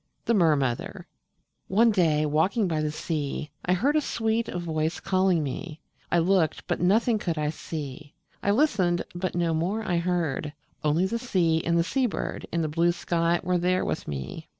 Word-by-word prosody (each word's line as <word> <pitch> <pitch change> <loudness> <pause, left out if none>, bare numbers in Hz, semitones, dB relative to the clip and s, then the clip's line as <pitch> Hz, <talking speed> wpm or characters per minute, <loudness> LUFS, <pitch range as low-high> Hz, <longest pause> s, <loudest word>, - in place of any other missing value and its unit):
THE 235 - +2
MER 170 -7 +4
MOTHER 130 -4 -2 0.6
One 225 +4 +4
day, 160 -6 +2
walking 185 +8 +1
by 160 -3 0
the 155 - 0
sea, 150 -2 -3
I 180 - +2
heard 270 +11 +2
a 305 - +4
sweet 225 -3 -1
voice 160 -2 -2
calling 185 -3 +2
me: 155 +3 -5 0.3
I - - +3
looked 170 -2 +2
but - - -2
nothing 215 +5 +3
could 170 -5 -2
I 150 0 0
see; 145 -2 -7 0.3
I - - 0
listened 200 - +2
but 180 0 -3
no 170 -1 +1
more 185 +8 -1
I 175 -4 0
heard; 170 -4 -1 0.3
Only 155 +4 +2
the 230 +4 -2
sea 170 -9 +1
and 170 0 +1
the 170 - +3
sea 260 +8 +1
bird 210 - -4
And 170 -1 0
the - - 0
blue 170 +3 +2
sky 170 0 0
were 180 0 +1
there 180 +1 +1
with - - -3
me. 70 -3 -6
175 Hz, 185 wpm, -26 LUFS, 155-190 Hz, 0.6 s, MER